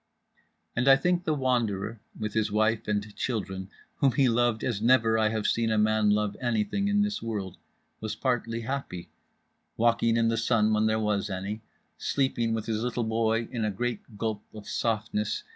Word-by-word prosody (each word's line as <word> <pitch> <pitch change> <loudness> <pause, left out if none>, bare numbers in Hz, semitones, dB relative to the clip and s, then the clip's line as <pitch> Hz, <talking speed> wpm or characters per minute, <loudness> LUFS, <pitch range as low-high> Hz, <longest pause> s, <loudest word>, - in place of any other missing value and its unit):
And 125 +3 +1
I 135 - +9
think 180 +4 0
The 155 - +1
Wanderer, 115 -5 0 0.2
with 110 -1 -3
his 110 -2 0
wife 110 +1 +1
and 105 0 -2
children 95 -6 -3 0.3
whom 135 -3 +3
he 135 +2 +4
loved 120 -1 +2
as 110 -5 -1
never 115 -1 +4
have 110 0 +1
I - - +1
seen 115 -1 +1
a 110 - +1
man 110 0 +3
love 105 0 +1
anything 120 - 0
in 205 0 +3
this 205 0 -2
world, 105 -5 -4 0.4
was 110 0 -4
partly 115 -3 -1
happy; 120 -8 -5 0.7
walking 115 0 +3
in 115 0 +3
the 115 0 +1
sun 110 -1 +2
when 110 0 +3
there 110 0 +2
was 105 -1 0
any, 100 +3 -4 0.4
sleeping 130 -4 0
with 110 -1 -3
his 110 -1 -1
little 120 0 -1
boy 115 0 +1
in 115 -2 -2
a 110 - +1
great 120 +1 -4
gulp 110 -1 -2
of 105 -1 -9
softness. 110 -2 -1
110 Hz, 180 wpm, -28 LUFS, 105-120 Hz, 0.7 s, I